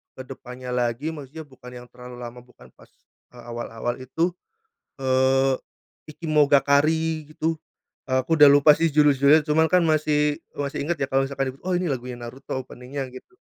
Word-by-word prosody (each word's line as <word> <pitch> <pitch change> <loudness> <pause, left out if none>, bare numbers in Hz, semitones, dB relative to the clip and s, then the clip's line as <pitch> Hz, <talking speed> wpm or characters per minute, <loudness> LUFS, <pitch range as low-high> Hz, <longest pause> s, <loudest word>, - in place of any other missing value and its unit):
ke 130 - -8
depannya 125 -1 -9
lagi, 120 +4 -1
maksudnya 150 +2 -9
bukan 125 -2 -14
yang 125 0 -11
terlalu 125 0 -11
lama, 120 0 -8
bukan 120 - -19
pas, - - -20 0.4
eee, 120 -1 -14
awal-awal 120 0 -4
itu, 165 +7 -1 0.7
eee, 130 0 +2 0.6
Ikimonogakari, 155 +1 +2
gitu. 160 +1 -1 0.5
Aku 130 +5 0
udah 150 - +9
lupa 145 +1 +6
sih 165 0 +1
judul-judulnya, 145 0 +5
cuman 160 +2 +4
kan 180 -1 +5
masih 150 -1 +1 0.2
masih 140 -1 -4
inget 165 +4 0
ya. - - -1
Kalo 135 0 +2
misalkan 135 -1 -3
itu, - - -23
"Oh! 185 - -1
Ini 175 0 0
lagunya 125 -2 -4
Naruto, 130 +2 -6
opening-nya," 130 +2 -7
gitu. 130 - -13
135 Hz, 160 wpm, -24 LUFS, 125-155 Hz, 0.7 s, udah